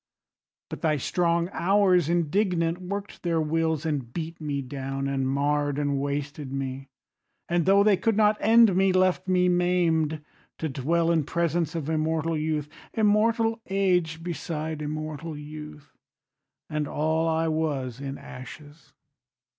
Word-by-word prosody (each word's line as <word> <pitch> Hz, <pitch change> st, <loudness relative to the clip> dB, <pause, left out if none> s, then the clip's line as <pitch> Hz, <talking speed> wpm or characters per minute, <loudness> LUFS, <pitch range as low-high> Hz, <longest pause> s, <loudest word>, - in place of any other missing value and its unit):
But -, -, -6 dB
thy 155 Hz, -2 st, +2 dB
strong 170 Hz, +4 st, +1 dB
Hours 185 Hz, -3 st, +3 dB
indignant 175 Hz, 0 st, +1 dB
work'd 200 Hz, +2 st, -6 dB
their 170 Hz, -2 st, 0 dB
wills, 160 Hz, 0 st, 0 dB
And 140 Hz, -7 st, -2 dB
beat 165 Hz, +3 st, -6 dB
me 145 Hz, -2 st, -2 dB
down 135 Hz, +1 st, -4 dB
and 135 Hz, -1 st, -1 dB
marr'd 145 Hz, +1 st, 0 dB
and 145 Hz, -1 st, 0 dB
wasted 145 Hz, 0 st, -3 dB
me, 135 Hz, 0 st, -4 dB, 0.6 s
And 175 Hz, 0 st, 0 dB
tho' 200 Hz, +1 st, +6 dB
they 205 Hz, -2 st, +4 dB
could 225 Hz, +1 st, +1 dB
not 215 Hz, 0 st, +4 dB
end 225 Hz, -2 st, +5 dB
me, 190 Hz, 0 st, +3 dB
left 185 Hz, 0 st, +2 dB
me 180 Hz, -1 st, +3 dB
maim'd 170 Hz, -4 st, +1 dB, 0.3 s
To 160 Hz, -, -3 dB
dwell 165 Hz, +5 st, +1 dB
in 165 Hz, -2 st, +2 dB
presence 170 Hz, 0 st, -1 dB
of 155 Hz, -4 st, -3 dB
immortal 160 Hz, +1 st, 0 dB
youth, 155 Hz, -1 st, -1 dB, 0.3 s
Immortal 225 Hz, +1 st, +2 dB
age 180 Hz, -4 st, +1 dB
beside 160 Hz, -2 st, -4 dB
immortal 155 Hz, +1 st, -5 dB
youth, 150 Hz, 0 st, -10 dB, 0.7 s
And 150 Hz, -1 st, -2 dB
all 160 Hz, +3 st, 0 dB
I 165 Hz, 0 st, +1 dB
was, 145 Hz, -6 st, -2 dB
in 140 Hz, 0 st, -5 dB
ashes. 145 Hz, +4 st, -12 dB
160 Hz, 140 wpm, -26 LUFS, 145-180 Hz, 0.7 s, tho